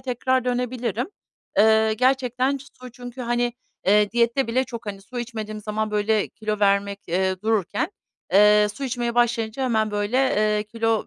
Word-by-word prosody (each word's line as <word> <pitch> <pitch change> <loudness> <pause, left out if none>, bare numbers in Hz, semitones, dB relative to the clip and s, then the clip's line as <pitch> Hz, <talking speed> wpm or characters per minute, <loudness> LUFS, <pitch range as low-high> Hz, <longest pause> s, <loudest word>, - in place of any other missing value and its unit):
tekrar 260 0 0
dönebilirim. 245 - -2 0.5
Eee, 220 0 +5
gerçekten 255 +2 +1 0.2
su 250 -1 -10
çünkü, 245 +1 -9
hani, 240 0 0 0.3
eee, 210 +1 +4
diyette 235 +2 +2
bile 255 +3 +1
çok, 235 -4 -8
hani, 200 -1 -5
su 245 +4 -8
içmediğim 220 -3 -5
zaman, 215 +1 -2
böyle, 210 0 +1
kilo 215 -1 -4
vermek, 200 0 +2
eee, 185 +1 0
dururken, 220 - 0 0.4
eee, 210 +1 +6
su 280 - -5
içmeye 240 -2 -2
başlayınca 235 0 +1
hemen, 220 -4 +1
böyle, 205 +4 -1
eee, 215 -5 +2
kilo 225 0 -1
225 Hz, 150 wpm, -23 LUFS, 210-250 Hz, 0.5 s, eee